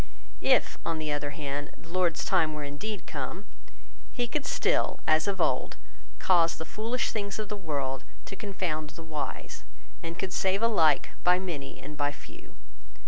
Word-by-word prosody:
If, - - +4
on 165 -1 0
the 155 -1 -1
other 145 0 0
hand, 145 0 -4
the 165 - -15
Lord's 175 -2 +2
time 160 -5 +3
were 150 - -3
indeed 160 +7 -4
come, 155 +8 -4 0.7
he 245 -2 0
could 280 +4 -2
still, - - +2
as 155 +2 +4
of 195 -1 0
old, - - +1 0.4
cause 170 -3 +4
the 160 - -4
foolish 230 +7 -1
things 200 -2 -2
of 215 -2 -3
the 210 - -2
world 140 -8 -2 0.2
to 195 - -6
confound 180 -7 -2
the 165 - -10
wise, 155 -3 -4 0.4
and 165 +1 -5
could 190 - -2
save 190 +3 +2
alike 170 -10 +5
by 180 0 +6
many 165 -7 -4
and 150 +2 -8
by 145 0 +2
few. 140 - -13
165 Hz, 170 wpm, -30 LUFS, 150-195 Hz, 0.7 s, by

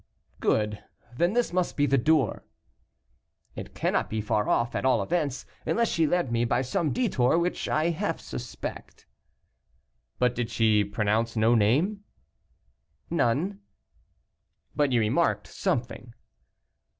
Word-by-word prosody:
"Good; 105 -1 0 0.3
then 175 +8 +1
this 240 -6 0
must 180 -1 -1
be 145 - +3
the 140 -1 +2
door." 150 -3 +1 1.1
"It - - -8
cannot - - 0
be 110 - -2
far 105 -1 0
off, 120 0 +1
at - - -2
all 125 -6 +3
events, 145 - -2 0.2
unless 235 0 +1
she 165 -2 +2
led 175 -5 0
me 115 0 +1
by 120 +2 +1
some 145 +4 -1
detour, 165 - +2
which 175 +1 -1
I 155 +3 +1
half 170 0 -2
suspect." 125 -1 -8 1.1
"But 125 -1 +2
did 120 -1 -3
she 110 -2 +3
pronounce 105 +3 -1
no 110 +1 +3
name?" 145 - +2 1.1
"None." 170 +7 0 1.2
"But 145 -2 +2
you 120 - +3
remarked 120 +10 +1
something?" 125 -8 -3
125 Hz, 130 wpm, -27 LUFS, 115-170 Hz, 1.2 s, be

